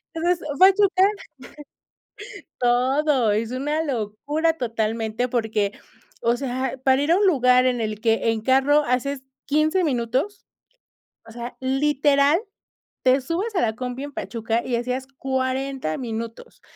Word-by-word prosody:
Entonces, 340 Hz, -1 st, 0 dB
Pachuca 385 Hz, 0 st, +5 dB, 1.6 s
Todo, 255 Hz, 0 st, +2 dB
es 220 Hz, +2 st, -1 dB
una 295 Hz, +5 st, -1 dB
locura 285 Hz, +5 st, -1 dB
totalmente 225 Hz, -1 st, -2 dB
porque, 220 Hz, -4 st, -1 dB, 0.5 s
o 235 Hz, +1 st, +2 dB
sea, 260 Hz, 0 st, -3 dB
para 265 Hz, +1 st, +4 dB
ir 305 Hz, -, -1 dB
a 345 Hz, -, +5 dB
un 405 Hz, +1 st, +3 dB
lugar 255 Hz, -6 st, +4 dB
en 250 Hz, -2 st, 0 dB
el 215 Hz, -1 st, -3 dB
que 225 Hz, 0 st, +2 dB
en 220 Hz, -1 st, -2 dB
carro 270 Hz, +4 st, +3 dB
haces 265 Hz, +2 st, -1 dB, 0.2 s
15 310 Hz, +5 st, +1 dB
minutos, 260 Hz, -, -1 dB, 0.8 s
o -, -, -11 dB
sea, 240 Hz, +1 st, -8 dB
literal, 280 Hz, +3 st, +2 dB, 0.6 s
te 260 Hz, +1 st, +4 dB
subes 365 Hz, -, -3 dB
a -, -, +3 dB
la 220 Hz, -2 st, 0 dB
combi 250 Hz, +2 st, -5 dB
en 290 Hz, -, -8 dB
Pachuca 230 Hz, -1 st, -2 dB
y 245 Hz, -2 st, -1 dB
hacías 250 Hz, +2 st, -3 dB
40 265 Hz, -, -2 dB
minutos. 230 Hz, -, -7 dB
260 Hz, 130 wpm, -23 LUFS, 235-290 Hz, 1.6 s, Pachuca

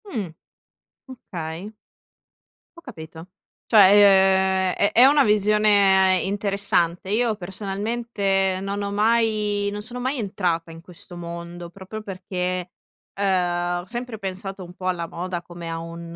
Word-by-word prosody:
Mh. 225 Hz, -, -4 dB, 0.8 s
Okay. 180 Hz, -5 st, -7 dB, 1.0 s
Ho -, -, -12 dB
capito. 165 Hz, -, -11 dB, 0.4 s
Cioè 190 Hz, -2 st, +5 dB
ehm, -, -, -3 dB
è 205 Hz, -, +1 dB
è 245 Hz, -, +7 dB
una 285 Hz, +1 st, +5 dB
visione 205 Hz, -3 st, +4 dB
interessante. 195 Hz, -3 st, -1 dB
Io 225 Hz, +1 st, +1 dB
personalmente 195 Hz, 0 st, -2 dB
non 200 Hz, +1 st, -3 dB
ho 200 Hz, 0 st, -3 dB
mai, 210 Hz, -1 st, +1 dB
non 205 Hz, 0 st, -5 dB
sono 245 Hz, +3 st, -5 dB
mai 260 Hz, +3 st, -2 dB
entrata 175 Hz, -5 st, -2 dB
in 165 Hz, -, -11 dB
questo 175 Hz, 0 st, -13 dB
mondo 170 Hz, 0 st, -8 dB
proprio 195 Hz, +4 st, -9 dB
perché, 185 Hz, -2 st, -4 dB, 0.4 s
ehm, 175 Hz, -3 st, 0 dB
ho -, -, -13 dB
sempre 240 Hz, +1 st, -6 dB
pensato 195 Hz, 0 st, -6 dB
un 175 Hz, 0 st, -11 dB
po' 185 Hz, -, -10 dB
alla 175 Hz, -2 st, -1 dB
moda 175 Hz, +1 st, -5 dB
come 175 Hz, -1 st, -9 dB
a 165 Hz, -, -3 dB
un, 170 Hz, 0 st, -8 dB
195 Hz, 135 wpm, -23 LUFS, 175-210 Hz, 1.0 s, è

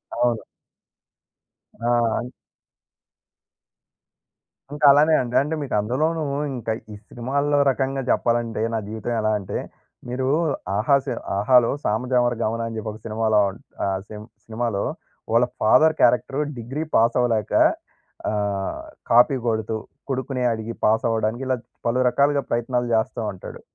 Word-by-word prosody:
అవును. 120 Hz, -1 st, +1 dB, 1.4 s
ఆ! 120 Hz, -1 st, +1 dB, 2.5 s
ఇంక 150 Hz, 0 st, -7 dB
అలానే 150 Hz, +3 st, +5 dB
అండి. 120 Hz, -1 st, -4 dB
అంటే, 150 Hz, +3 st, -2 dB
మీకు 140 Hz, -, -5 dB
అందులోనూ, 155 Hz, +10 st, 0 dB, 0.3 s
ఇంక 115 Hz, -2 st, -6 dB, 0.2 s
ఈ -, -, -7 dB
సినిమాల్లో 140 Hz, +4 st, 0 dB
రకంగా 135 Hz, +1 st, -2 dB
చెప్పాలంటే, 115 Hz, -2 st, 0 dB
నా 110 Hz, -, 0 dB
జీవితం 110 Hz, +2 st, -4 dB
ఎలా 110 Hz, 0 st, +1 dB
అంటే, 95 Hz, -, -5 dB, 0.5 s
మీరు 130 Hz, +1 st, -2 dB, 0.5 s
ఆహా 125 Hz, +7 st, +3 dB
సి 135 Hz, -, -4 dB, 0.3 s
'ఆహా'లో, 120 Hz, +3 st, +4 dB
'సామాజవర‌గమన' 120 Hz, 0 st, 0 dB
అని 115 Hz, -, -6 dB
జెప్పి 110 Hz, 0 st, -4 dB
ఒక 110 Hz, -, -11 dB
సినిమాలో 110 Hz, -1 st, +1 dB
ఉం 95 Hz, -, -10 dB, 0.3 s
ఆ -, -, 0 dB, 0.2 s
సిం 105 Hz, 0 st, -9 dB, 0.2 s
సినిమాలో, 115 Hz, -2 st, -2 dB, 0.5 s
వాళ్ళ 120 Hz, +2 st, +4 dB, 0.2 s
ఫాదర్ 155 Hz, +8 st, +5 dB
క్యారెక్టరు 130 Hz, +3 st, +3 dB, 0.2 s
డిగ్రీ 135 Hz, +7 st, -4 dB
పాసవలేక, 115 Hz, -1 st, +2 dB, 0.8 s
ఆహ్, 100 Hz, -2 st, -2 dB, 0.3 s
కాపీ 125 Hz, +4 st, +6 dB
కొడుతూ, 110 Hz, -1 st, -1 dB, 0.3 s
కొడుకుని 130 Hz, 0 st, -2 dB
అడిగి 110 Hz, +1 st, -4 dB
పాసవడానికి 110 Hz, +2 st, +1 dB
ఇలాగ 130 Hz, -2 st, 0 dB, 0.3 s
పలు 120 Hz, +2 st, +1 dB
రకాలుగా 140 Hz, +2 st, +2 dB
ప్రయత్నాలు 120 Hz, +1 st, 0 dB
జేస్తా 110 Hz, +1 st, 0 dB
ఉంటాడు. 95 Hz, -, -10 dB
120 Hz, 120 wpm, -23 LUFS, 110-130 Hz, 2.5 s, కాపీ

